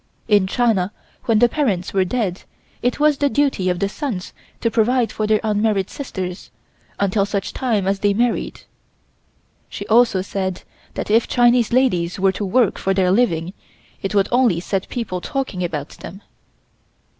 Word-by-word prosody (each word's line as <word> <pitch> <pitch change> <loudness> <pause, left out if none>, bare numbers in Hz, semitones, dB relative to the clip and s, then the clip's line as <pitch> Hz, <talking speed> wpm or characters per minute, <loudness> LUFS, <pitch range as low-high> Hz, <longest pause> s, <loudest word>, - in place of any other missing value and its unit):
In 205 -3 +4
China 210 -4 +1 0.3
when 225 -2 +3
the 240 +3 +5
parents 215 - -1
were 190 -1 +3
dead 190 -2 -2 0.4
it 245 +3 0
was 300 -1 +3
the 285 - +2
duty 275 -11 +1
of 180 - 0
the 200 - 0
sons 205 -4 -5 0.3
to 230 - 0
provide 235 +1 +2
for 215 - -2
their 215 0 +3
unmarried 210 -2 0
sisters 185 -9 -6 0.5
until 200 0 +2
such 200 -1 -3
time 220 -7 0
as 195 0 0
they 205 0 +2
married. 240 +2 -1 1.1
She - - -6
also 225 -5 +3
said 190 -2 -3 0.3
that - - -3
if 225 +2 +3
Chinese 240 -1 +3
ladies 185 -9 +1
were 190 0 +3
to 200 - -5
work 220 +2 +2
for 195 0 0
their 185 -1 +2
living 185 -6 +1 0.5
it 195 +1 -3
would 200 0 +3
only 240 -8 +3
set 190 +2 -3
people 205 -7 -4
talking 260 -9 -3
about 155 -4 -3
them. 195 +3 -11
205 Hz, 165 wpm, -20 LUFS, 190-240 Hz, 1.1 s, the